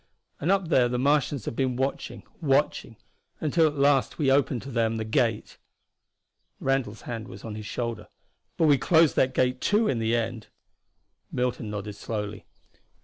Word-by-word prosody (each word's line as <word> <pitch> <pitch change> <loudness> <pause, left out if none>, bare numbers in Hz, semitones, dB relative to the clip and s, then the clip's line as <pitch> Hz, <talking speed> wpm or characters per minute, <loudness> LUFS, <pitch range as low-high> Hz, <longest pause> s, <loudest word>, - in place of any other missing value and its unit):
And 165 +6 +1
up 195 -4 +1
there 125 -6 +4
the 125 - -1
Martians 140 -2 +1
have - - -4
been 130 -1 0
watching, 135 +2 -3 0.2
watching 140 -5 +1 0.4
until 160 +1 +3
at 150 - -3
last 140 -1 +2
we 140 -4 +2
opened 135 -3 +2
to 135 - -8
them 115 -2 0
the 110 - -3
gate." 115 0 -1 1.0
Randall's 135 -5 -1
hand 115 -3 -5
was 95 +2 -11
on 110 - -5
his 105 0 -7
shoulder. 115 0 -4 0.5
"But 165 - +3
we 145 -3 +5
closed 160 -3 +4
that 130 0 +2
gate, 125 0 +1
too, 215 +2 +2
in 120 - 0
the 115 +1 +1
end." 115 -1 -3 0.8
Milton 125 -3 -2
nodded 105 -1 -5
slowly. 105 -2 -5
125 Hz, 165 wpm, -26 LUFS, 115-140 Hz, 1.0 s, we